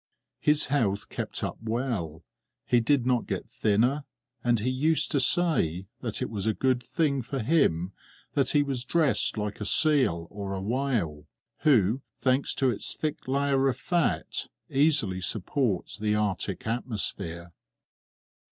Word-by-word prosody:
His 150 0 +4
health 110 -8 0
kept - - -5
up - - -4
well; 110 - -3 0.4
he 120 - +3
did 125 +2 +2
not 125 -2 +1
get - - -3
thinner, 125 +8 +1 0.4
and 120 -2 +2
he 115 +5 -1
used 150 +5 +1
to 145 - +2
say 125 - +2
that 115 -3 -3
it - - -3
was 105 -1 -2
a 110 - +1
good 130 +4 +1
thing 140 +1 0
for 135 +3 -5
him 110 - +2 0.4
that 140 -2 +2
he 145 -1 +3
was 135 -4 -2
dressed 150 -3 +2
like 105 0 -3
a - - -2
seal 130 - +3
or 100 -1 -5
a - - -3
whale, 105 - -2 0.3
who, 120 -3 +3 0.2
thanks 130 +1 +1
to 135 -2 +2
its 110 - -1
thick 155 -4 -4
layer 135 0 +2
of 130 -3 0
fat, 175 +1 0 0.2
easily 140 - +2
supports 110 +2 -1
the 105 0 +1
Arctic 100 -3 -2
atmosphere. 100 -7 -2
120 Hz, 150 wpm, -27 LUFS, 100-140 Hz, 0.4 s, His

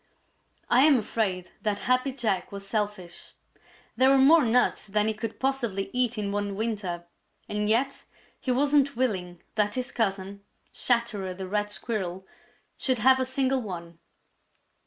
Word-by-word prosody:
I 245 - +5
am 300 -4 +6
afraid 195 -5 -2
that 210 -1 0
Happy 255 +2 +2
Jack 225 -8 -2
was 200 0 -6
selfish. 205 -4 -4 0.6
There 260 +1 +5
were 275 - +6
more 295 +4 +6
nuts 245 -1 +2
than 210 +1 +1
he 220 - +1
could 220 +1 -6
possibly 235 -8 -1
eat 245 -2 0
in 205 -1 -2
one 205 -1 -2
winter, 200 -6 -3 0.4
and 210 0 -1
yet 260 +5 +1 0.3
he - - -6
wasn't 280 +1 +3
willing 185 -8 -2
that 210 -1 0
his 250 -1 -3
cousin, 200 -2 -2 0.3
Chatterer 215 -6 0
the 190 0 -6
Red 205 +2 -1
Squirrel, 190 -4 -4 0.5
should 260 -2 0
have 260 +4 +5
a 260 - +1
single 260 0 +1
one. 170 -5 -7
215 Hz, 150 wpm, -27 LUFS, 195-255 Hz, 0.6 s, am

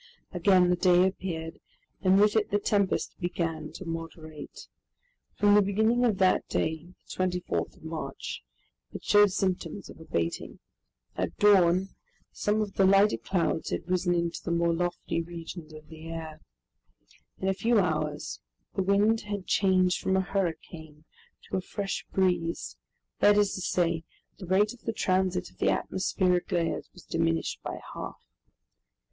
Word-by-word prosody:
Again 180 0 +4
the - - +4
day 180 0 +4
appeared 165 -4 -4 0.4
and 190 0 +4
with 210 +1 +4
it 215 -1 +2
the 205 - +2
tempest 200 -1 0
began 165 -3 -3
to 185 - -8
moderate. 165 -2 -7 0.7
From 205 0 +4
the 210 - +7
beginning 220 +5 +2
of 220 -5 +2
that 185 -1 +3
day, 160 +3 -2
the - - -9
24th 180 -1 -2
of - - -20
March, 160 0 -5 0.5
it - - -8
showed 205 -1 +5
symptoms 185 -1 -2
of - - -15
abating. 85 - -3 0.6
At - - -3
dawn, 190 -2 +5 0.4
some 210 +1 0
of 205 -2 -3
the 195 - +2
lighter 200 +2 +5
clouds 175 -3 -1
had - - -3
risen 180 -1 +1
into 170 -1 -1
the - - -4
more 170 0 +2
lofty 175 0 -2
regions 165 -1 -8
of 155 0 -12
the 160 0 -11
air. 160 -1 -7 1.0
In 190 - -3
a 195 - +3
few 230 +4 +2
hours 155 -4 -2 0.3
the - - 0
wind 205 +4 +3
had 205 -2 -5
changed 185 -2 +2
from 190 0 +1
a - - +3
hurricane 160 -5 -4 0.4
to - - -3
a - - -1
fresh 195 +2 -4
breeze, 180 -3 0 0.4
that 205 0 +5
is 205 -1 +3
to 185 - -4
say, 170 -2 0 0.4
the 185 - -8
rate 205 +4 +3
of 245 - -17
the 225 - -3
transit 185 -2 0
of - - -27
the - - +2
atmospheric 185 -1 0
layers 170 -2 -1
was 180 - -15
diminished 165 0 -1
by - - -5
half. - - -8
180 Hz, 155 wpm, -28 LUFS, 165-195 Hz, 1.0 s, the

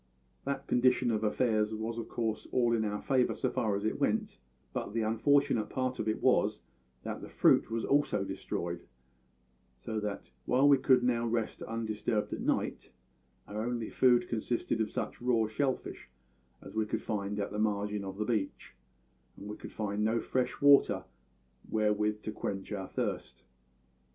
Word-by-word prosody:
That 140 0 -2
condition 125 0 +3
of 110 -1 0
affairs 110 -1 +1
was 115 +2 -3
of 115 - -6
course 110 -2 -2
all 120 -2 +3
in 115 -1 +2
our 105 -1 -2
favour, 130 -2 +2
so 130 - -1
far 110 -4 0
as 100 +1 -3
it 110 - -1
went; - - 0 0.3
but - - -3
the 115 - +1
unfortunate 115 +1 +2
part 130 -1 -2
of 110 - -2
it 110 - -1
was - - +3 0.4
that - - -5
the - - -8
fruit - - +4
was 115 0 -2
also 140 -8 +2
destroyed; 85 -2 -4 0.9
so 110 - -4
that, 105 -9 -5
while 130 +3 +4
we 140 -2 +6
could 130 -2 +4
now 120 -1 +1
rest 115 -1 -2
undisturbed 110 -1 -2
at - - -4
night, - - -1 0.6
our 105 +1 -4
only 120 -2 -3
food 120 -2 +4
consisted 115 0 -1
of 110 - 0
such - - -4
raw 120 -2 +2
shell 130 +5 +1
fish - - -10 0.5
as - - -10
we 110 -1 0
could - - -2
find 105 -1 -2
at 100 - -2
the 105 - -3
margin 105 -1 0
of 95 0 -6
the 105 - -1
beach; 105 -4 -2 0.6
and 100 - -9
we 105 - -5
could - - -10
find 105 -1 -2
no 110 +2 +2
fresh 125 +2 -1
water 145 -1 +6 0.7
wherewith 105 0 +1
to 110 - -3
quench 100 -2 -4
our 95 -2 -3
thirst. 65 0 -4
110 Hz, 175 wpm, -31 LUFS, 105-120 Hz, 0.9 s, we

